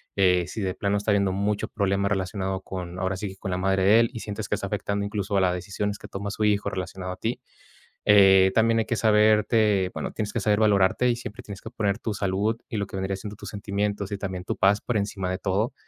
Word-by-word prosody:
eh, 90 Hz, -3 st, +3 dB
si 110 Hz, -, -6 dB
de 95 Hz, -1 st, -1 dB
plano 100 Hz, 0 st, 0 dB
está 105 Hz, +1 st, 0 dB
habiendo 100 Hz, -2 st, +2 dB
muchos 100 Hz, +1 st, -1 dB
problemas 100 Hz, 0 st, 0 dB
relacionado 95 Hz, 0 st, -2 dB
con, 90 Hz, -2 st, -6 dB
ahora 95 Hz, +1 st, -1 dB
sí, 95 Hz, -1 st, -5 dB
con 95 Hz, -, -5 dB
la 90 Hz, -, -1 dB
madre 95 Hz, 0 st, +1 dB
de 105 Hz, +4 st, +6 dB
él 115 Hz, -, +1 dB
y 115 Hz, -, -6 dB
sientes 105 Hz, -1 st, -5 dB
que -, -, +1 dB
está -, -, -5 dB
afectando 100 Hz, 0 st, -2 dB
incluso 100 Hz, -1 st, -2 dB
a -, -, +3 dB
las 90 Hz, -1 st, +2 dB
decisiones 100 Hz, +3 st, -3 dB
que -, -, -10 dB
toma 100 Hz, +1 st, -5 dB
su 105 Hz, -, -3 dB
hijo 100 Hz, -1 st, +1 dB
relacionado 95 Hz, 0 st, -5 dB
a -, -, -11 dB
ti, 115 Hz, +5 st, -3 dB, 0.6 s
eh, 95 Hz, -2 st, +6 dB
también 115 Hz, 0 st, +3 dB
hay 110 Hz, -, 0 dB
que 115 Hz, -, -1 dB
saberte, 105 Hz, -2 st, +3 dB
bueno, -, -, -4 dB
tienes 105 Hz, -1 st, -3 dB
que 115 Hz, -, 0 dB
saber 105 Hz, +1 st, +2 dB
valorarte 105 Hz, +3 st, +3 dB
y 120 Hz, -, 0 dB
siempre 120 Hz, 0 st, -8 dB
tienes 100 Hz, -3 st, -9 dB
que 110 Hz, -, -8 dB
poner 105 Hz, -3 st, -1 dB
tu 110 Hz, -, -3 dB
salud 100 Hz, +3 st, 0 dB
y 115 Hz, -, -4 dB
lo 100 Hz, -, -1 dB
que 95 Hz, -, -8 dB
vendría 95 Hz, 0 st, -2 dB
siendo 105 Hz, +2 st, -8 dB
tus -, -, -9 dB
sentimientos 100 Hz, -1 st, -3 dB
y 100 Hz, -, -2 dB
también 95 Hz, -2 st, -5 dB
tu -, -, -2 dB
paz 100 Hz, +1 st, +3 dB
por 120 Hz, -4 st, -1 dB
encima 100 Hz, -2 st, -2 dB
de 95 Hz, -, -2 dB
todo. 100 Hz, +5 st, 0 dB
100 Hz, 245 wpm, -25 LUFS, 95-105 Hz, 0.6 s, de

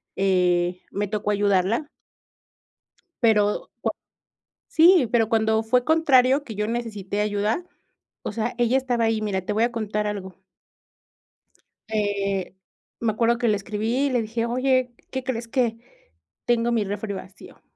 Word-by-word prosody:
eh, 180 Hz, -2 st, +1 dB
me 205 Hz, 0 st, -2 dB
tocó 210 Hz, 0 st, -2 dB
ayudarla 205 Hz, +6 st, +1 dB, 1.3 s
pero, 210 Hz, -2 st, +2 dB
co -, -, 0 dB, 0.8 s
Sí, 330 Hz, -5 st, +5 dB
pero 225 Hz, -3 st, +3 dB
cuando 220 Hz, -1 st, +2 dB
fue 245 Hz, +2 st, +2 dB
contrario 285 Hz, -3 st, +4 dB
que 220 Hz, -, -7 dB
yo 210 Hz, +1 st, -1 dB
necesité 215 Hz, -4 st, -3 dB
ayuda, 210 Hz, -, 0 dB, 0.6 s
o -, -, -3 dB
sea, 230 Hz, +2 st, -3 dB
ella 240 Hz, +2 st, +3 dB
estaba 245 Hz, -3 st, 0 dB
ahí. 225 Hz, -1 st, +1 dB
Mira, 195 Hz, -3 st, -1 dB
te -, -, -2 dB
voy 220 Hz, +2 st, +2 dB
a 240 Hz, -, +1 dB
contar 210 Hz, -2 st, -2 dB
algo 190 Hz, -2 st, -6 dB, 1.5 s
Eh, 200 Hz, -3 st, -1 dB, 0.4 s
me 230 Hz, -2 st, +1 dB
acuerdo 235 Hz, +1 st, +2 dB
que 240 Hz, -, 0 dB
le 210 Hz, -, +3 dB
escribí 220 Hz, +7 st, -1 dB
y -, -, -1 dB
le 245 Hz, -3 st, +1 dB
dije: 230 Hz, +1 st, -2 dB
"Oye, 255 Hz, +1 st, +1 dB, 0.2 s
¿qué 260 Hz, -1 st, -3 dB
crees?, 235 Hz, -3 st, -3 dB
que 235 Hz, -3 st, 0 dB, 0.7 s
tengo 240 Hz, 0 st, +2 dB
mi 225 Hz, -3 st, +2 dB
refri 205 Hz, +1 st, -4 dB
vacío", 190 Hz, 0 st, -11 dB
220 Hz, 145 wpm, -24 LUFS, 205-240 Hz, 1.5 s, Sí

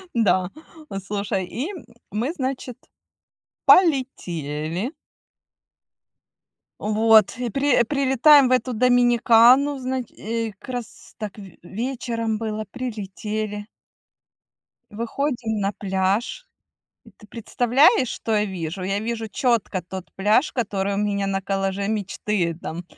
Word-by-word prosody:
М-да, 190 Hz, -5 st, +2 dB, 0.6 s
слушай, 200 Hz, -2 st, -2 dB
и 250 Hz, -, -4 dB, 0.4 s
мы, 235 Hz, +9 st, -2 dB
значит, 260 Hz, -5 st, -4 dB, 0.9 s
полетели. 180 Hz, -, +2 dB, 1.9 s
Вот, 215 Hz, 0 st, +4 dB
и 245 Hz, -1 st, -2 dB
при 275 Hz, 0 st, +2 dB
прилетаем 275 Hz, +2 st, +5 dB
в -, -, -2 dB
эту 255 Hz, 0 st, +1 dB
Доминикану, 245 Hz, +3 st, +5 dB
значи 255 Hz, -2 st, -4 dB
и 225 Hz, 0 st, -3 dB
как -, -, -13 dB
раз 245 Hz, -2 st, -8 dB
так 210 Hz, -1 st, -6 dB
вь 195 Hz, -4 st, -12 dB
вечером 230 Hz, +2 st, -3 dB
было, 215 Hz, -1 st, -3 dB
прилетели. 215 Hz, -3 st, -5 dB, 1.2 s
Выходим 235 Hz, 0 st, -2 dB
на 195 Hz, 0 st, 0 dB
пляж. 200 Hz, -, -1 dB, 0.6 s
И 225 Hz, -, -16 dB
ты -, -, -16 dB
представляешь, 245 Hz, +3 st, +3 dB
что 225 Hz, -, -2 dB
я 210 Hz, 0 st, +2 dB
вижу? 185 Hz, -1 st, -5 dB
Я 195 Hz, +2 st, -1 dB
вижу 225 Hz, 0 st, -3 dB
чётко 230 Hz, -8 st, 0 dB
тот 185 Hz, +1 st, -9 dB
пляж, 210 Hz, +9 st, +2 dB
который 200 Hz, -5 st, -1 dB
у -, -, -2 dB
меня 200 Hz, -1 st, 0 dB
на 195 Hz, 0 st, -1 dB
коллаже 195 Hz, 0 st, -2 dB
мечты, 200 Hz, -4 st, -1 dB
там, 170 Hz, +2 st, -5 dB
220 Hz, 110 wpm, -23 LUFS, 195-250 Hz, 1.9 s, прилетаем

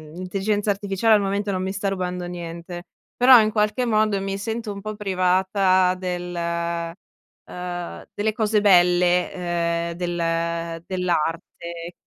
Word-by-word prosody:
l'intelligenza 200 Hz, +3 st, -1 dB
artificiale 200 Hz, +2 st, +1 dB
al 210 Hz, -, +5 dB
momento 200 Hz, +1 st, -1 dB
non 185 Hz, -1 st, -2 dB
mi 190 Hz, 0 st, -2 dB
sta 200 Hz, +1 st, -3 dB
rubando 180 Hz, -2 st, -3 dB
niente, 175 Hz, 0 st, -7 dB, 0.3 s
però 250 Hz, 0 st, +8 dB
in 215 Hz, 0 st, +2 dB
qualche 215 Hz, +3 st, +1 dB
modo 215 Hz, -3 st, +2 dB
mi 195 Hz, 0 st, -3 dB
sento 225 Hz, 0 st, -4 dB
un 200 Hz, -, -8 dB
po' 215 Hz, +1 st, -5 dB
privata 185 Hz, -1 st, +2 dB
del 180 Hz, -1 st, -4 dB
uhm, 170 Hz, +1 st, -5 dB
delle 215 Hz, +1 st, -1 dB
cose 215 Hz, -1 st, +1 dB
belle 180 Hz, -2 st, +4 dB
,ehm, 170 Hz, -1 st, -2 dB
del 170 Hz, -1 st, -2 dB
dell'arte. 170 Hz, -1 st, -3 dB
185 Hz, 130 wpm, -23 LUFS, 175-205 Hz, 0.3 s, però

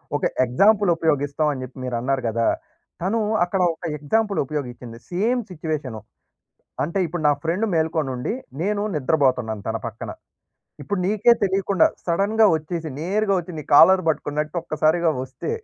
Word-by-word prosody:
ఒక -, -, -2 dB, 0.2 s
ఎగ్జాంపుల్ 200 Hz, -, +3 dB
ఉపయోగిస్తాం 150 Hz, -1 st, 0 dB
అని 130 Hz, -3 st, -5 dB
జెప్పి 130 Hz, +1 st, -10 dB
మీరు 125 Hz, -1 st, -3 dB
అన్నారు 130 Hz, +2 st, -1 dB
గదా! 115 Hz, +1 st, 0 dB, 0.5 s
తను 200 Hz, +6 st, 0 dB, 0.2 s
అక్కడ 180 Hz, +1 st, -1 dB
ఒక 170 Hz, -, -19 dB
ఎగ్జాంపుల్ 205 Hz, +7 st, 0 dB
ఉపయోగిచ్చింది 125 Hz, -5 st, -6 dB
సేమ్ 230 Hz, +8 st, +1 dB
సిట్యుయేషను. 150 Hz, -9 st, -4 dB, 0.8 s
అంటే 170 Hz, +6 st, -2 dB
ఇప్పుడు 170 Hz, 0 st, -4 dB
నా -, -, +6 dB
ఫ్రెండ్ 175 Hz, +7 st, 0 dB
మేల్కొనుండి 160 Hz, -, -1 dB, 0.3 s
నేను 205 Hz, +2 st, 0 dB
నిద్రబోతున్నాను 130 Hz, -7 st, +1 dB
తన 110 Hz, 0 st, -1 dB
పక్కన. 115 Hz, 0 st, -7 dB, 0.7 s
ఇప్పుడు 180 Hz, +7 st, -2 dB
నీకే 215 Hz, +4 st, +4 dB
తెలీకుండా 195 Hz, -1 st, +2 dB, 0.2 s
సడెన్‌గా 200 Hz, +5 st, +3 dB
వచ్చేసి, 160 Hz, +1 st, -5 dB
నేరుగా 200 Hz, +4 st, +1 dB
వచ్చి 180 Hz, 0 st, -6 dB
నీ -, -, -5 dB
కాలర్ 185 Hz, +5 st, +7 dB
పట్టుకున్నట్టు 150 Hz, +1 st, -2 dB
ఒక్కసారిగా 160 Hz, +1 st, +1 dB
వస్తే, 130 Hz, -, -6 dB
160 Hz, 140 wpm, -22 LUFS, 135-190 Hz, 0.8 s, కాలర్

